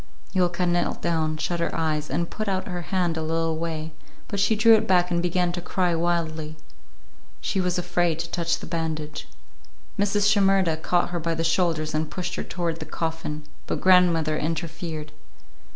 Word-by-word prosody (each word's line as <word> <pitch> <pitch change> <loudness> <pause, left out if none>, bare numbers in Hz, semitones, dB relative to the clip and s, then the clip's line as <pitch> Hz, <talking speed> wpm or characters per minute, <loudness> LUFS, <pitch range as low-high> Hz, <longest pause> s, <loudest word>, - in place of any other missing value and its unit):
Yulka 180 -1 +1
knelt 175 0 +1
down, 160 -2 0
shut 170 +2 -2
her 170 - +1
eyes, 155 -2 -1
and 170 +5 -1
put 215 - -4
out 190 -1 -1
her 180 -2 -3
hand 180 -3 +1
a - - -1
little 165 0 0
way, 160 -1 -3 0.4
but 200 - -3
she 205 +3 +3
drew 225 +2 +6
it 220 - +4
back 180 -1 +3
and 170 0 +2
began 180 0 +1
to 175 0 -4
cry 180 0 0
wildly. 165 -2 -1 0.8
She 190 - -1
was 180 -1 0
afraid 175 -2 +1
to 170 +1 -4
touch 170 -1 0
the - - -9
bandage. 155 -2 -3 0.7
Mrs. 205 0 +3
Shimerda 195 -5 +3
caught 175 +2 +1
her 175 - -1
by 165 0 -1
the 165 - -1
shoulders 165 -2 +1
and 155 0 -1
pushed 180 -1 -4
her - - -3
toward 170 -2 -3
the - - -5
coffin, 160 -2 -3 0.2
but - - -1
grandmother 170 -4 +4
interfered. 160 -1 -4
170 Hz, 180 wpm, -25 LUFS, 160-180 Hz, 0.8 s, drew